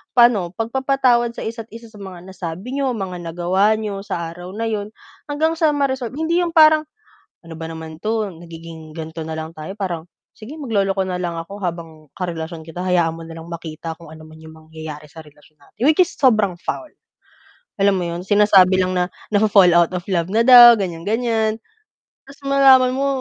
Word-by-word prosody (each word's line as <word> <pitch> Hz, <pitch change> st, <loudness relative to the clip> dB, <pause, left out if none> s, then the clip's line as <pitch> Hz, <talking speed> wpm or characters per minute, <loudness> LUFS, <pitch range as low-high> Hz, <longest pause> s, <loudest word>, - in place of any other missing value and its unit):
pa'no, 215 Hz, -8 st, +4 dB
pagpapatawad 245 Hz, 0 st, +1 dB
sa -, -, -6 dB
isa't-isa 225 Hz, 0 st, -8 dB
sa 210 Hz, -, -14 dB
mga 190 Hz, -3 st, -9 dB
nasabi 185 Hz, +6 st, -7 dB
n'yo, 270 Hz, -2 st, 0 dB
mga 190 Hz, -4 st, -5 dB
nagawa 175 Hz, +5 st, +1 dB
n'yo, 210 Hz, -2 st, -4 dB
sa 170 Hz, -4 st, -4 dB
araw 175 Hz, +2 st, -10 dB
na 225 Hz, +1 st, -3 dB
'yun 210 Hz, -1 st, -3 dB, 0.4 s
hanggang 315 Hz, +3 st, 0 dB
sa 315 Hz, -2 st, +3 dB
ma-resolve 265 Hz, -4 st, -1 dB
hindi 320 Hz, +3 st, 0 dB
'yong 335 Hz, -1 st, -3 dB
parang, 310 Hz, -1 st, +6 dB, 0.6 s
"Ano 165 Hz, -, -9 dB
ba 160 Hz, 0 st, -6 dB
naman 160 Hz, 0 st, -9 dB
'to 220 Hz, -1 st, -1 dB
nagiging 165 Hz, -1 st, -11 dB
ganito 160 Hz, 0 st, -6 dB
na 160 Hz, 0 st, -6 dB
lang 160 Hz, +1 st, -7 dB
tayo", 155 Hz, +4 st, -7 dB
parang 175 Hz, -5 st, -3 dB, 0.3 s
"Sige, 230 Hz, +7 st, -10 dB
magloloko 200 Hz, -10 st, -1 dB
na 185 Hz, -1 st, -2 dB
lang 175 Hz, -1 st, -3 dB
ako 165 Hz, +4 st, -7 dB
habang 165 Hz, -4 st, -7 dB
karelasyon 165 Hz, -2 st, -5 dB
kita, 165 Hz, +3 st, -7 dB
hayaan 175 Hz, -2 st, +2 dB
mo 165 Hz, -, -9 dB
na 165 Hz, -, -10 dB
lang 165 Hz, +1 st, -10 dB
makita 165 Hz, -1 st, -7 dB
kung 165 Hz, -2 st, -13 dB
ano 160 Hz, -, -13 dB
man 155 Hz, 0 st, -14 dB
yung 160 Hz, 0 st, -13 dB
mangyayari 160 Hz, -1 st, -10 dB
sa 160 Hz, +2 st, -12 dB
relasyon 150 Hz, +1 st, -21 dB
natin." 220 Hz, -, -22 dB
Which 310 Hz, -, +3 dB
is 355 Hz, -, -8 dB
sobrang 215 Hz, -9 st, +2 dB
foul, 315 Hz, -, -5 dB, 0.9 s
alam 200 Hz, 0 st, +3 dB
mo -, -, -2 dB
'yon? 170 Hz, +1 st, -5 dB
Sinasabi 195 Hz, -3 st, +5 dB
lang 185 Hz, 0 st, -1 dB
na 180 Hz, 0 st, +1 dB, 0.2 s
nafo-fall 205 Hz, -3 st, +5 dB
out 170 Hz, 0 st, +3 dB
of 180 Hz, -, -3 dB
love 170 Hz, -3 st, 0 dB
na 220 Hz, -, +3 dB
daw, 240 Hz, -1 st, +10 dB
ganyan, 175 Hz, -6 st, -4 dB
ganyan 225 Hz, -1 st, 0 dB, 0.7 s
tapos 280 Hz, -, -15 dB
malaman 265 Hz, -2 st, +5 dB
mo 275 Hz, +1 st, 0 dB
190 Hz, 190 wpm, -20 LUFS, 165-230 Hz, 0.9 s, daw